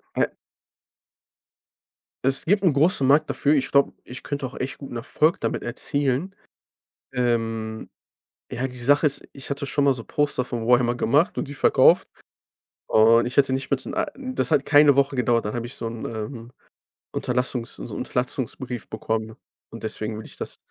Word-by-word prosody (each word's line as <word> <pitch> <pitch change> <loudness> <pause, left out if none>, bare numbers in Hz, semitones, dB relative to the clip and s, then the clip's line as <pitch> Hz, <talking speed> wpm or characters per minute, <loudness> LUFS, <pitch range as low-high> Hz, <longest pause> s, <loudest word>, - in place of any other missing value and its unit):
Äh - - +2 2.0
es 135 0 +1
gibt 200 +3 +2
'n 175 - +5
großen 140 0 +2
Markt 150 +3 +4
dafür. 145 +2 +2
Ich 135 - 0
glaube, 140 0 +3
ich 125 0 -9
könnte 145 -1 -4
auch 130 - -9
echt 130 +1 -4
guten 135 -4 -8
Erfolg 150 +7 +1
damit - - -2
erzielen. 140 +7 -1 0.8
Ähm, 115 -3 -1 0.6
ja, 130 +2 -2
die 125 - -11
Sache 145 +5 +3
ist, 140 - -2
ich 135 - -10
hatte 140 +1 -2
schon 145 +1 +1
mal 140 -1 +4
so 115 -3 -8
Poster 145 -3 0
von 120 -3 -4
Warhammer 120 0 +4
gemacht 145 - +2
und 145 - -3
die 145 - -7
verkauft. - - +5 0.8
Und 115 +1 +5
ich 125 - -4
hätte 135 -2 +4
nicht 135 0 -3
mal 130 -1 0
in - - -5
ei - - +1
das 255 -7 -3
hat 145 -3 +3
keine 145 -1 +6
Woche 140 0 +2
gedauert, 120 -3 +1
dann 105 - -3
habe 120 - -3
ich 120 - -7
so 115 - -4
'n, 115 0 -6
ähm, 115 +2 -6 0.6
Unterlassungs 125 -1 -2
so - - -8
'n - - -8
Unterlassungsbrief 125 -1 -3
bekommen. 110 0 -3 0.3
Und - - -10
deswegen 110 0 -3
würde 110 - -8
ich - - -13
das - - -6
130 Hz, 180 wpm, -24 LUFS, 115-145 Hz, 2.0 s, keine